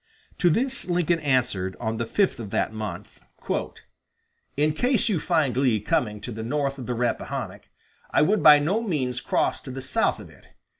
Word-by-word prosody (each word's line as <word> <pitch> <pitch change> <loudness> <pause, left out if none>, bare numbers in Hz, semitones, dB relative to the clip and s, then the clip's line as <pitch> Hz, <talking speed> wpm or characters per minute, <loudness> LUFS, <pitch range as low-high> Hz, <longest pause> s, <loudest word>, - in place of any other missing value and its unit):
To 175 - +4
this 255 - 0
Lincoln 175 -1 +1
answered 125 - 0
on 110 -1 -2
the 115 - -3
fifth 195 - +1
of 110 -4 -6
that 110 - -1
month: 110 -1 -7 1.4
"In 150 +1 +2
case 245 - +1
you 190 -6 +1
find 150 -7 +1
Lee 125 -4 +2
coming 105 +1 -1
to 120 - -6
the 110 0 -6
north 140 +3 -2
of 125 - -7
the 125 - -2
Rappahannock, 120 -2 -3 0.4
I - - +3
would 205 +6 +2
by 150 -1 +9
no 175 +10 0
means 135 - -2
cross - - 0
to - - -10
the 130 +1 -6
south 130 - 0
of - - -12
it. - - -20
135 Hz, 185 wpm, -25 LUFS, 115-165 Hz, 1.4 s, by